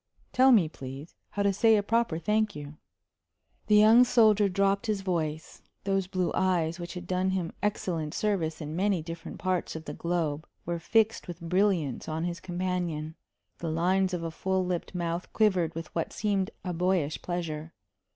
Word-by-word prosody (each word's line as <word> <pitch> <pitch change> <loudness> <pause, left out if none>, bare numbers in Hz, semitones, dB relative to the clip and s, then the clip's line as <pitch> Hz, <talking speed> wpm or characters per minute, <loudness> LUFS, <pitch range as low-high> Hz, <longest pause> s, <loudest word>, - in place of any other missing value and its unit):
tell 260 +1 +6
me, 200 -10 +6
please, 135 +1 -9 0.2
how 200 - -2
to 200 -1 +3
say 225 +3 +5
a 205 - +1
proper 230 -5 +1
thank 215 +4 0
you." 145 0 -8 0.9
The 210 - +5
young 220 +4 +8
soldier 215 -4 +4
dropped 195 +2 +1
his 210 -2 0
voice. 160 -5 -3 0.2
Those 195 -1 0
blue 185 -2 -1
eyes 175 -3 +1
which 175 +1 -6
had 180 0 -6
done 185 +1 0
him 185 -3 -2
excellent 170 -6 -2
service 175 -7 -1
in 155 +1 -5
many 190 -2 +1
different 165 0 -7
parts 185 -3 -1
of 160 0 -7
the - - -5
globe 165 -3 -2 0.2
were 170 0 -2
fixed 220 +6 +1
with 175 -2 -7
brilliance 175 -6 0
on 160 +1 -2
his 175 0 -3
companion; 175 -4 -3 0.5
the 165 - -3
lines 185 +4 +2
of 175 -2 -3
a 165 - -3
full 190 +3 -1
lipped 180 0 -3
mouth 170 0 -3
quivered 185 -7 +2
with 165 -1 -7
what 165 - -2
seemed 200 -3 0 0.2
a 180 - -2
boyish 175 -3 0
pleasure. 165 -3 -4
180 Hz, 175 wpm, -28 LUFS, 165-200 Hz, 0.9 s, young